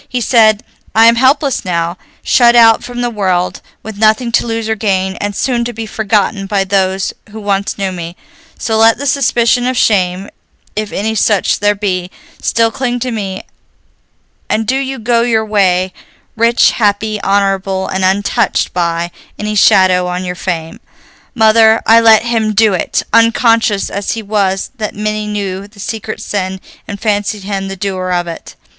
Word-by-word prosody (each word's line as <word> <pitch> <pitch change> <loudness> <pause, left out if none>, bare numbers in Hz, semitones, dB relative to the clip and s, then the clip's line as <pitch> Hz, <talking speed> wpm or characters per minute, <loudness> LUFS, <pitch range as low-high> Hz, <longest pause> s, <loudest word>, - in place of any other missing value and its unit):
He 250 - -2
said, 220 -3 +3 0.3
'I 225 +1 +6
am 230 0 +6
helpless 270 +2 +2
now, 170 -1 -2 0.3
shut 240 -1 +4
out 225 -1 +5
from 245 0 -6
the 240 - 0
world, 185 -4 -1 0.2
with 215 -1 -8
nothing 220 +2 +2
to 235 - +1
lose 225 -1 -3
or 220 - +1
gain, 190 -3 -1
and 205 0 -4
soon 245 0 0
to 240 - -4
be 225 0 -6
forgotten 210 -2 -1
by 200 -1 0
those 190 0 0 0.2
who 220 +2 -9
once 200 0 -2
knew 195 -2 -2
me, 170 -1 -7 0.4
so 220 -2 -1
let 225 0 +5
the 285 - -5
suspicion 245 -2 +1
of 255 -1 -1
shame, 190 -3 +1 0.5
if 215 0 -3
any 220 +3 -2
such 210 -2 +1
there 205 0 +2
be, 185 -3 -2 0.3
still 230 -1 +1
cling 245 0 -2
to 255 0 -2
me, 195 -4 -4 1.1
and 220 +1 0
do 255 - 0
you 270 0 -3
go 230 0 +1
your 225 -2 +1
way, 185 -3 +1 0.4
rich, 230 +1 +3
happy, 210 -1 -1
honorable, 195 -1 0
and 190 0 -2
untouched 195 +2 0
by 170 -1 -1 0.3
any 210 0 -3
shadow 185 -3 +4
on 180 +1 -3
your 180 - -3
fame.' 170 -3 -5 0.6
Mother, 220 0 +5
I 225 +1 +6
let 225 -1 +5
him 225 -2 0
do 215 -1 +4
it, 180 - -1
unconscious 230 -2 +2
as 200 0 -3
he 225 - -5
was 200 -2 -1
that 215 -1 -4
many 215 0 -3
knew 200 -2 -4
the 205 0 -20
secret 215 +1 -5
sin 190 -2 -3 0.3
and 200 0 -6
fancied 205 -1 -1
him 195 -1 -4
the 195 - -5
doer 185 -1 -3
of 175 -1 0
it." 170 -1 -9
210 Hz, 175 wpm, -13 LUFS, 190-225 Hz, 1.1 s, I